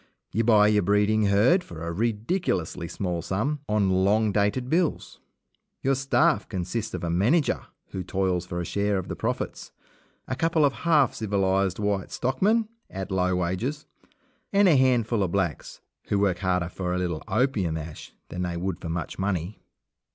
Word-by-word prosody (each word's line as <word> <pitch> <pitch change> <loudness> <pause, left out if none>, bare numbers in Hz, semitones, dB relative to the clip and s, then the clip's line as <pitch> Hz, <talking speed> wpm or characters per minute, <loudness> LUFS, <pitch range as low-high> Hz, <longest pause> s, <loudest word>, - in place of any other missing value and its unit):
You 115 - +1
buy 105 -2 +5
your 105 -1 +3
breeding 105 +2 +2
herd 115 - +4
for 85 -1 -8
a 85 - -3
ridiculously 105 - -1
small 90 -1 -3
sum, 115 - -1
on 105 -3 +2
long 105 +2 +3
dated 105 +5 +1
bills. 165 +3 -1 0.6
Your 135 - +3
staff 135 +5 +2
consists 100 +3 -3
of - - -6
a 85 - -1
manager, 120 - +1 0.2
who 95 - -5
toils 95 -1 -1
for 85 -1 -4
a 85 - -3
share 100 +1 0
of 95 - -4
the - - -3
profits, - - -3 0.6
a 130 - -2
couple 165 +1 +2
of 140 - +2 0.2
half 150 -6 +4
civilized 95 -3 0
white 100 -2 -1
stockmen 200 - +1 0.2
at 95 0 -6
low 90 -1 +1
wages, 95 - -2 0.7
and 200 0 +5
a 170 - +6
handful 120 -4 +2
of 95 -3 -1
blacks, 95 -6 -2 0.3
who 100 - +1
work 100 -3 +1
harder 90 -3 0
for 90 -1 -3
a - - 0
little 85 -4 -2
opium 105 -7 +1
ash 80 -1 -8 0.2
than 90 - -5
they 90 -1 -2
would 90 0 -3
for 85 - -5
much 85 +2 -4
money. 95 0 -2
100 Hz, 170 wpm, -26 LUFS, 90-125 Hz, 0.7 s, a